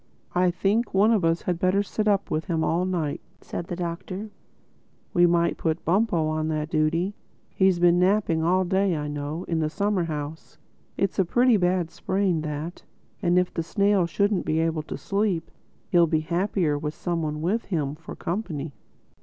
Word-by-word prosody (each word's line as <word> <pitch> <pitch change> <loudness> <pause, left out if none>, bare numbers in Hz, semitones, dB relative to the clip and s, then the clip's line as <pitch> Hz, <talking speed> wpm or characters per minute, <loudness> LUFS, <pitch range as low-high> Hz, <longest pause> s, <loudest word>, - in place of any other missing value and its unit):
"I 180 0 +3
think 205 +5 0
one 205 +4 +5
of 215 -5 +2
us 165 0 +1
had 175 -2 -1
better 185 +3 +2
sit 215 +1 -2
up 200 -1 +1
with 155 +1 -1
him 165 -2 0
all 170 +3 +1
night," 165 -6 -2 0.2
said 170 - -6
the 175 - -4
Doctor. 185 +4 -5 0.8
"We 175 0 +5
might 170 0 +2
put 160 0 -1
Bumpo 180 -2 +2
on 155 0 -1
that 155 0 -2
duty; 165 +5 +1 0.4
he's 190 -2 +3
been 175 0 +4
napping 185 -3 +2
all 185 +3 +2
day, 190 -1 +1
I 150 0 -3
know—in 150 +3 -3
the 155 -1 0
summer 200 +1 0
house. 155 0 -6 0.4
It's 195 -1 0
a - - +6
pretty 245 +7 +3
bad 180 -3 +1
sprain, 190 -4 0
that; 155 +3 -5 0.4
and 175 -2 +2
if 180 0 +1
the - - -1
snail 200 +1 +2
shouldn't 200 +2 +1
be 155 - 0
able 160 -1 +1
to 150 - -7
sleep, 195 -5 -1 0.4
he'll 170 -1 +5
be 155 0 +1
happier 170 -2 0
with 150 +1 -4
some 170 -1 -2
one 150 -1 -3
with 195 +9 -1
him 150 -7 -1
for 155 +1 -10
company. 165 -6 -4
175 Hz, 180 wpm, -25 LUFS, 160-190 Hz, 0.8 s, a